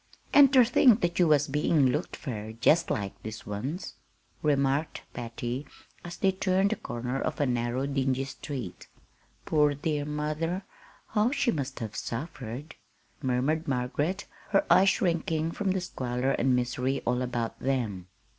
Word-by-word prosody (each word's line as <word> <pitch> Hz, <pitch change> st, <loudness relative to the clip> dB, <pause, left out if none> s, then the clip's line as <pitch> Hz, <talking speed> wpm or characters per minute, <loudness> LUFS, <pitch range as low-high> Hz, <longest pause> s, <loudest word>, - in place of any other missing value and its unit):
"An' 285 Hz, -1 st, +9 dB
ter 260 Hz, -2 st, +6 dB
think 240 Hz, -1 st, +5 dB
that 175 Hz, 0 st, 0 dB
you 175 Hz, -, +5 dB
was 150 Hz, -2 st, +4 dB
bein' 150 Hz, -1 st, +3 dB
looked 150 Hz, +7 st, -2 dB
fur 110 Hz, -5 st, -6 dB
jest 155 Hz, +9 st, +3 dB
like 100 Hz, -2 st, -3 dB
this 110 Hz, 0 st, -7 dB
once," 130 Hz, -, -4 dB, 0.5 s
remarked 140 Hz, 0 st, +1 dB
Patty, 120 Hz, +3 st, -4 dB, 0.4 s
as 175 Hz, 0 st, -7 dB
they 195 Hz, -, +3 dB
turned 190 Hz, +1 st, +1 dB
the -, -, +1 dB
corner 125 Hz, -, -4 dB
of -, -, -2 dB
a 145 Hz, -, +3 dB
narrow, 120 Hz, +1 st, 0 dB
dingy 135 Hz, -1 st, 0 dB
street. 135 Hz, -, -7 dB, 0.6 s
"Poor 150 Hz, -2 st, +3 dB
dear 145 Hz, 0 st, -1 dB
mother! 155 Hz, +5 st, -2 dB, 0.5 s
how 215 Hz, +1 st, +2 dB
she 270 Hz, -3 st, +1 dB
must 140 Hz, -, -3 dB
have 110 Hz, -1 st, -5 dB
suffered," 130 Hz, +2 st, -5 dB, 0.5 s
murmured 135 Hz, +5 st, 0 dB
Margaret, 145 Hz, +8 st, -1 dB, 0.2 s
her 195 Hz, -, +3 dB
eyes 195 Hz, +1 st, +7 dB
shrinking 165 Hz, -3 st, 0 dB
from 200 Hz, +2 st, -2 dB
the 190 Hz, 0 st, +1 dB
squalor 130 Hz, -6 st, -2 dB
and 130 Hz, -1 st, +2 dB
misery 125 Hz, +2 st, -1 dB
all 125 Hz, +1 st, +1 dB
about 120 Hz, -2 st, -3 dB
them. 115 Hz, -9 st, -2 dB
140 Hz, 150 wpm, -28 LUFS, 125-165 Hz, 0.6 s, An